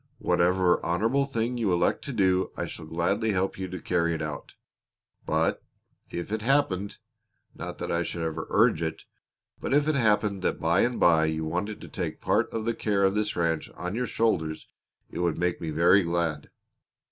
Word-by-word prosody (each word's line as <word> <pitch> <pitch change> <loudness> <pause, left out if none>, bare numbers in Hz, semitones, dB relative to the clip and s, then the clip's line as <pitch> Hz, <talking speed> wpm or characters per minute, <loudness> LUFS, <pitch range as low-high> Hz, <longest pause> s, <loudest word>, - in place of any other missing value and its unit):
Whatever 90 0 +2
honorable 115 +11 +1
thing 120 -1 -2
you 105 -5 +1
elect 85 - +1
to 140 - -4
do 95 -5 +2
I - - -2
shall 80 - -8
gladly 100 +7 0
help 95 0 -1
you 95 - -3
to 90 0 -6
carry 85 -2 0
out. 75 -1 -6 0.7
But 80 +1 +1 0.5
if 85 +3 -5
it 110 0 -1
happened 105 -6 +1 0.6
not - - -7
that - - -4
I 85 - +1
should 85 -1 -3
ever 80 0 -3
urge 80 - +3
it 80 -1 -3 0.6
but - - 0
if 145 +1 +3
it 155 - +3
happened 105 -6 +2
that - - -1
by 85 +3 +2
and 120 0 +1
by 80 -2 +5
you 80 0 -1
wanted 90 +6 -3
to - - -9
take - - -4
part - - +1
of 110 -1 -3
the 115 - +1
care 100 -3 0
of 95 0 +3
this 105 0 -1
ranch 85 -2 0
on 90 +2 -4
your 125 +2 -1
shoulders 80 -9 0 0.4
it - - -6
would 85 -2 0
make 90 0 -1
me 80 - -3
very 85 +6 +5
glad." 85 -4 -1
90 Hz, 190 wpm, -27 LUFS, 85-110 Hz, 0.7 s, by